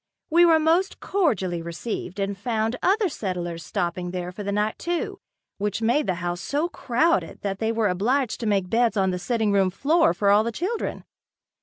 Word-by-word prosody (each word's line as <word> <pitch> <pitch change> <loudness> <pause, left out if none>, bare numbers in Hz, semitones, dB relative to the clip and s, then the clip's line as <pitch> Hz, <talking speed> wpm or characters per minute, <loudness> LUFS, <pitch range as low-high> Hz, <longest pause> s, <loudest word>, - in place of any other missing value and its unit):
We 345 +2 +6
were 325 -1 +6
most 330 +5 +1
cordially 195 - 0
received 180 +3 -5
and 200 0 -1
found 220 +2 -1
other 405 +2 +3
settlers 175 - -4
stopping 175 +3 -2
there 180 0 -4
for 190 - -8
the 200 0 -2
night 210 +1 -1
too, 345 0 -3 0.4
which 205 0 -1
made 255 +6 +2
the 185 - +1
house 175 0 -3
so 300 +5 -1
crowded 320 +4 0
that 195 -1 -2
they 225 0 0
were 225 -2 +1
obliged 225 +7 0
to 230 - -3
make 195 -3 +1
beds 230 +2 +2
on 190 -1 +2
the 180 - -3
sitting 220 +1 0
room 195 -2 +3
floor 315 - +2
for 200 -1 +3
all 205 +1 +5
the 235 - -2
children. 375 - -3
215 Hz, 190 wpm, -24 LUFS, 185-285 Hz, 0.4 s, We